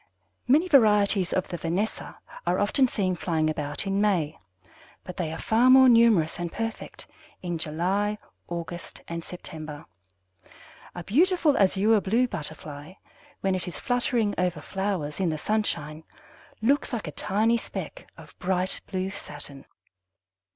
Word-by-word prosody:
Many 300 +8 +4
varieties 210 - +4
of 185 - 0
the 175 - -4
Vanessa 180 +7 -3 0.3
are - - +2
often 265 -3 +3
seen 190 -6 -1
flying 160 -2 0
about 145 +1 -1
in 195 +1 0
May, 170 -7 +1 0.6
but 180 - -8
they 170 -4 -2
are 160 - -5
far 230 +8 +3
more 260 0 +8
numerous 230 -10 +4
and 175 -1 -3
perfect 225 0 -5 0.4
in 175 -2 -3
July, 190 +7 -1 0.3
August, 175 0 -7
and 170 0 -5
September. 155 -3 -8 1.1
A 175 - -6
beautiful 320 - +3
Azure 205 +1 +3
blue 230 +7 +2
Butterfly, 150 -3 -7 0.5
when 195 -1 +1
it 185 -1 -3
is 180 - -6
fluttering 240 -4 0
over 180 -3 0
flowers 190 -3 -3
in 185 -3 +1
the 155 - -2
sunshine, 155 -6 -2 0.6
looks 275 +3 +2
like 230 - -2
a - - -4
tiny 220 +9 +1
speck - - -7
of - - -14
bright 185 0 -1
blue 190 0 -3
satin. 145 -6 -9
190 Hz, 140 wpm, -26 LUFS, 165-220 Hz, 1.1 s, more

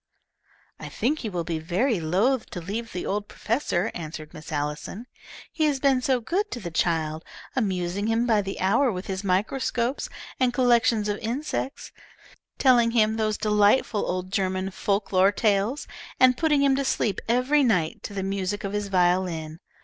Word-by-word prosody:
"I - - -7
think 300 +5 -1
he 225 - -4
will 175 -3 -3
be 165 -1 -3
very 190 - 0
loath 200 +11 +1
to - - -6
leave 215 +7 -5
the 180 - -4
old 205 +1 -2
professor," 225 -5 -1
answered 155 -1 -7
Miss 155 -2 -10
Allison. 150 +9 -4 0.5
"He 315 - 0
has 290 -3 +1
been 270 -2 +3
so 255 0 +2
good 375 - -1
to 245 - -5
the 175 -6 -6
child, 160 -1 0 0.3
amusing 195 -3 -1
him 225 +1 +1
by 220 -4 +3
the 195 0 -5
hour 230 +8 +3
with 185 -1 -5
his 190 0 -4
microscopes 235 +6 -1 0.3
and 250 -2 +2
collections 240 -3 +3
of 205 0 -2
insects, 265 +3 -4 0.7
telling 245 -3 +5
him 220 -2 +2
those 215 -1 0
delightful 210 +1 +2
old 185 +1 -3
German 190 -1 -1
folk 200 +2 -1
lore 190 +1 +5
tales, 210 +5 0 0.3
and 255 -1 +6
putting 295 -1 +2
him 275 -1 +4
to 275 - 0
sleep 215 -6 0
every 255 +5 +3
night 180 -10 +1
to 200 - -7
the 195 - -2
music 195 +1 -2
of 195 0 -4
his 205 -1 -2
violin. 175 -4 0
205 Hz, 170 wpm, -25 LUFS, 185-245 Hz, 0.7 s, and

